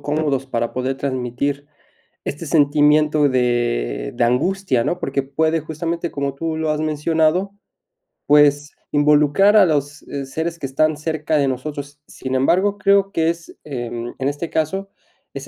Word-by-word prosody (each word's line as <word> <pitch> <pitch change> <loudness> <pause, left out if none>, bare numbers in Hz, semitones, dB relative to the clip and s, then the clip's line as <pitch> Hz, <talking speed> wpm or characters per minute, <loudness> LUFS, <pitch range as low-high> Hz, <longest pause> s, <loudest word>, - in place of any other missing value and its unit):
cómodos 145 -2 -1
para 120 -2 -2
poder 130 +1 -2
transmitir 140 +2 -3 0.6
este 150 +3 -5
sentimiento 150 0 +3
de 120 - 0
de 120 - +1
angustia, 130 +1 +1
¿no?, 175 - -1
porque 140 0 -1
puede 160 +4 0
justamente, 165 +2 -4
como 140 -1 -2
tú 160 +2 -3
lo 160 -1 -1
has 150 0 -1
mencionado, 160 +4 +1 0.8
pues 145 0 +4 0.2
involucrar 150 +7 +4
a 200 - +7
los, 145 -3 -1
eh, 140 -1 -5
seres 160 +5 -4
que - - -4
están 155 +3 +1
cerca 155 0 -1
de 140 -1 +2
nosotros. 145 +2 -5
Sin 130 0 -5
embargo, 185 +10 +2
creo 200 -1 +3
que 165 -2 +1
es, 170 0 -6
em, 120 -3 -5
en 135 - -1
este 145 +4 -5
caso, 190 +5 -2 0.4
es - - -7
150 Hz, 150 wpm, -20 LUFS, 135-160 Hz, 0.8 s, a